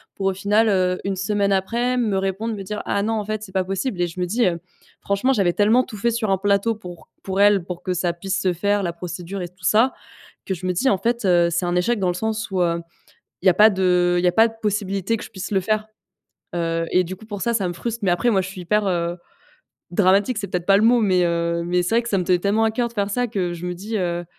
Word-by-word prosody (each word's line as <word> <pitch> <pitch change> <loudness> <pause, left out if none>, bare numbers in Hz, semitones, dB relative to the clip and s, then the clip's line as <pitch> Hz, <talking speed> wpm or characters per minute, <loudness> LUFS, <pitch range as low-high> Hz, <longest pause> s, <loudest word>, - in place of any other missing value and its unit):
pour 195 - -4
au 195 - +2
final, 210 +4 +2
heu, 185 -2 +1
1 195 -1 -1
semaine 200 +1 0
après, 235 +6 0
me 215 -5 +1
répondre, 195 +4 -2
me 195 - -6
dire: 210 +2 -5
«Ah 200 0 0
non, 225 - 0
en 215 -2 -1
fait, 215 0 -3
c'est 190 - -10
pas 190 0 0
possible» 195 +1 -3
et 175 - +2
je 170 +2 -9
me 180 - +1
dis, 225 +6 +1
heu: 170 -2 -1 0.4
«Franchement, 200 +7 0
j'avais 195 -8 +2
tellement 220 +5 +4
tout 215 - -10
fait 235 +4 +1
sur 220 -3 -1
un 190 - +2
plateau 205 +3 +2
pour 180 -5 -11
pour 190 0 -3
elle, 205 -2 +5
pour 175 0 -7
que 185 - -1
ça 175 -1 -1
puisse 195 +3 -3
se 185 - +2
faire, 205 +4 0
la 170 -1 -2
procédure 180 +2 -6
et - - -4
tout 180 +1 -24
ça», 220 +9 +3 0.5
que 190 - -2
je 185 - -8
me 180 - 0
dis: 265 +10 +1
«En 200 - +2
fait, 235 +4 -1
heu 175 -2 +4
c'est 175 +2 0
un 175 - 0
échec 205 +6 +1
dans 185 - 0
le - - 0
sens 220 +2 -2
où, 185 -2 0
heu, 170 0 0 0.6
il - - +3
y - - +10
a - - +4
pas 215 +1 +7
de 180 -2 +2
il 175 - -2
y - - +4
a - - +4
pas 225 +4 +5
de 225 - -10
possibilité 205 0 -1
que - - -8
je - - -11
puisse 190 -2 -6
le 195 - +3
faire». 215 +2 -1 0.7
Heu 165 -1 -1
et 180 - +3
du 185 +2 -6
coup, 220 - -15
pour 205 -3 -6
ça 235 - +1
ça 200 -5 +1
me - - -3
frustre. 235 +5 -4
Mais 185 - +3
après, 240 +7 +1
moi, 195 -3 +3
je 185 - -4
suis 190 -1 -8
hyper, 210 +3 +1
heu, 175 -1 -1 0.7
dramatique. 200 +5 +2
C'est 200 - -3
peut-être 180 -1 -3
pas 195 - +6
le - - +1
mot 240 +1 +5
mais, 185 -4 +3
heu, 170 0 0
mais 180 +1 +1
c'est 225 +6 0
vrai 240 - +3
que 235 - -6
ça 195 - +1
me 180 - -1
tenait 180 0 +3
tellement 205 +5 +1
à 220 - +2
cœur 235 +2 -1
de 235 - -18
faire 205 -2 -1
ça 245 +4 0
que 185 -6 -2
je 175 +1 -6
me 180 - -3
dis, 210 +5 -5
heu: 175 -1 -2
195 Hz, 290 wpm, -22 LUFS, 180-215 Hz, 0.7 s, y